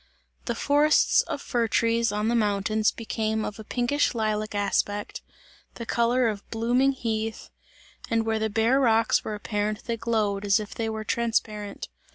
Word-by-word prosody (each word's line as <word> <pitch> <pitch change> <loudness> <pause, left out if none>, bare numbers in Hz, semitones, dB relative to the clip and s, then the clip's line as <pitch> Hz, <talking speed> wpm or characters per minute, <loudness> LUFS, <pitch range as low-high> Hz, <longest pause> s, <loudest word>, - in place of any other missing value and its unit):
The 235 - -2
forests 295 +5 +4
of - - -4
fir 235 -2 0
trees 230 0 +1
on 210 +1 -1
the 235 - +1
mountains 215 -1 +1
became 220 -1 -2
of 210 - -6
a - - -7
pinkish 245 +5 0
lilac 215 -1 -1
aspect, 205 0 -1 0.5
the 235 - -6
colour 235 +2 +2
of 210 -2 -4
blooming 245 +4 +2
heath, 225 -3 -3 0.6
and 225 -1 +1
where 220 0 0
the 220 0 0
bare 225 +5 +2
rocks 230 -3 +3
were 215 - -4
apparent, 210 0 -2
they 235 -1 -3
glowed 215 -3 0
as 200 0 +3
if 210 -1 -7
they 225 -1 -2
were 220 0 -4
transparent. 215 -2 -2
225 Hz, 165 wpm, -26 LUFS, 210-235 Hz, 0.6 s, forests